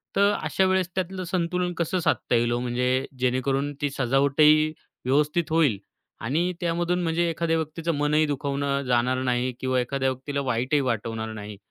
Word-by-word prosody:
तर 200 +1 +4
अशा 190 - +1
वेळेस 185 -1 +1
त्यातलं 185 0 -2
संतुलन 180 0 0
कसं 170 +2 0
साधता 155 - +1
येईल 120 0 +2
ओ, 120 - 0
म्हणजे 125 +2 0
जेणेकरून 135 +3 0
ती 145 - +1
सजावटही 140 +4 +4 0.3
व्यवस्थित 150 +5 +1
होईल 155 -10 +3 0.4
आणि 160 +10 0
त्यामधून 175 +1 0
म्हणजे 170 +1 +1
एखाद्या 165 0 0
व्यक्तीचं 160 +1 -2
मनही 150 +2 +2
दुखवणं 140 0 -1
जाणार 125 +1 +1
नाही 125 0 0
किंवा 130 -1 0
एखाद्या 135 +2 0
व्यक्तीला 140 +2 -4
वाईटही 130 +2 0
वाटणार 115 -2 -2
नाही. 105 -1 -8
140 Hz, 155 wpm, -25 LUFS, 125-165 Hz, 0.4 s, तर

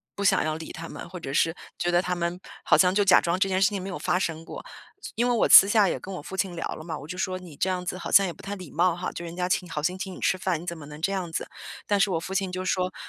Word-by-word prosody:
不 200 - -4
想 195 - +4
要 155 0 -1
理 160 - -8
他 165 +1 -7
们，” 175 - -9
或 180 +1 -8
者 135 -4 -6
是 165 +3 +2 0.2
觉 175 - 0
得 175 0 +3
他 180 -1 -2
们 175 +1 -2 0.2
好 - - +4
像 180 -1 +4
就 205 +1 +3
假 190 -2 +6
装 170 +2 -1
这 195 - +2
件 185 0 +1
事 195 - +5
情 200 -3 -4
没 190 - -6
有 190 - -4
发 180 - +1
生 165 -3 -3
过。 - - -8 0.4
所 - - -8
因 240 +2 +1
为 245 - +2
我 230 - +2
私 195 - +10
下 205 -1 +4
也 - - -2
跟 195 - -8
我 180 - -6
父 190 +6 -8
亲 190 -3 -1
聊 165 - -4
了 - - -9
嘛， 160 -1 -5
我 145 - -10
就 180 +3 -6
说： 185 0 -2
“你 175 -5 -12
这 - - 0
样 180 -1 -2
子 180 - -3
好 - - -6
像 200 - +7
也 - - -3
不 - - -16
太 200 - -5
礼 180 -5 -10
貌 175 +2 +2
哈， 180 +1 -4
就 170 - -7
人 170 0 -7
家 180 0 -2
请 185 - +1
你 - - -13
好 150 - -3
心 180 +4 -1
请 190 0 -5
你 - - -10
吃 190 - +1
饭， 185 -3 -1
你 - - -10
怎 170 - -4
么 150 - -10
能 150 +1 -11
这 195 +4 +1
样 185 -4 -3
子？” 165 - -3 0.4
但 205 -1 +2
是 195 0 +3
我 165 - 0
父 185 +3 -6
亲 190 -1 0
就 185 0 -4
说： 185 0 0
180 Hz, 370 characters per minute, -26 LUFS, 170-190 Hz, 0.4 s, 私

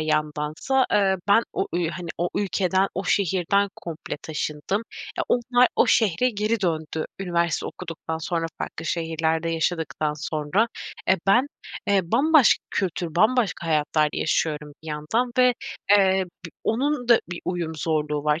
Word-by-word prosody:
yandansa, 155 - 0
eee, 195 -2 +3
ben 225 +3 +6
o - - -1
ü 175 -2 +1
hani, 175 -1 -7
o 175 +1 0
ülkeden, 190 -1 +1
o 190 - -3
şehirden 200 +1 +2
komple 165 -2 -6
taşındım. 155 +6 -2 0.4
E, - - +2
onlar 245 0 +3
o - - +5
şehre 225 +3 +3
geri 215 0 -1
döndü 160 -3 -1 0.2
üniversite 170 -3 0
okuduktan 160 -2 -6
sonra, 165 0 -2
farklı 165 - -5
şehirlerde 160 0 -1
yaşadıktan 160 -2 -1
sonra. 155 +8 0 0.4
E, - - +7
ben, 245 +8 +5 0.4
eee, 200 -1 +4
bambaşka 280 - +4
kültür, 175 -4 -2
bambaşka 215 -5 +2
hayatlar 155 -1 +2
yaşıyorum 150 -2 -1
bir 160 - -9
yandan 155 +12 -1
ve, 250 -1 +5 0.4
eee, 190 -2 +5 0.2
bi - - -11
onun 245 +2 0
da 235 - +6
bir 175 - -5
uyum 170 -3 -2
zorluğu 150 -2 -1
var. 150 +2 +2
175 Hz, 145 wpm, -24 LUFS, 160-205 Hz, 0.4 s, E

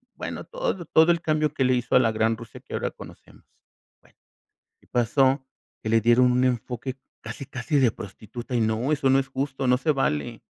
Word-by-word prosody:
bueno, - - -6
todo - - -3
todo 160 +2 +5
el 170 - -4
cambio 155 -2 0
que 140 - 0
le 130 0 +3
hizo 125 -1 0
a - - +8
la 115 -3 +2
gran 110 +1 +1
Rusia 115 -2 -11
que - - -13
ahora - - -2
conocemos, - - -14 0.6
bueno, - - -27 0.6
y - - -26
pasó 130 +3 +2 0.4
que - - -4
le 115 0 +4
dieron 120 +3 +4
un 125 +1 +2
enfoque 125 +1 -2 0.3
casi, 110 +5 -7
casi 135 +4 -1
de 125 -3 +4
prostituta 110 +5 -8
y 115 - +2
no, 110 +6 0
eso 135 -3 +2
no 135 - +5
es 135 - -4
justo, 135 0 -3
no 125 0 +4
se 155 - 0
vale, 75 - -2
125 Hz, 205 wpm, -25 LUFS, 115-140 Hz, 0.6 s, a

